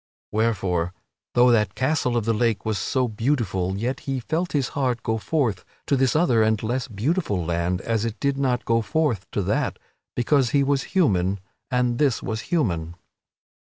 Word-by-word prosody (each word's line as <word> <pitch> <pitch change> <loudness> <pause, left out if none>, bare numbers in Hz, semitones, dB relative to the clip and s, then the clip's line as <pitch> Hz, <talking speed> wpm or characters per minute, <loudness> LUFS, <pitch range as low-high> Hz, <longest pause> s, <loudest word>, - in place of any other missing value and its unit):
Wherefore, 95 -6 0 0.4
though 125 0 +6
that 105 -5 +2
Castle 130 -2 +1
of 115 - -1
the 115 - +2
Lake 115 0 0
was 110 -2 0
so 130 -2 0
beautiful, 105 -6 -1
yet 120 +6 -2
he 135 -1 0
felt 165 +8 -2
his 140 -4 +1
heart 125 -4 -1
go 110 0 0
forth 120 - 0 0.2
to 140 - +2
this 130 0 +2
other 140 -9 +3
and 110 0 +2
less 125 +4 -1
beautiful 110 - -1
land 85 +2 -1
as 115 -2 -1
it 115 -1 -3
did 140 -1 +1
not 130 -3 0
go 115 0 +2
forth 125 - -1
to 100 - -1
that, - - 0 0.4
because 130 +1 +2
he 140 +1 +3
was 140 0 +1 0.2
human 100 - +2 0.3
and 125 -2 +1
this 140 -6 +2
was 110 -1 -3
human. 85 - 0
115 Hz, 175 wpm, -24 LUFS, 105-135 Hz, 0.4 s, though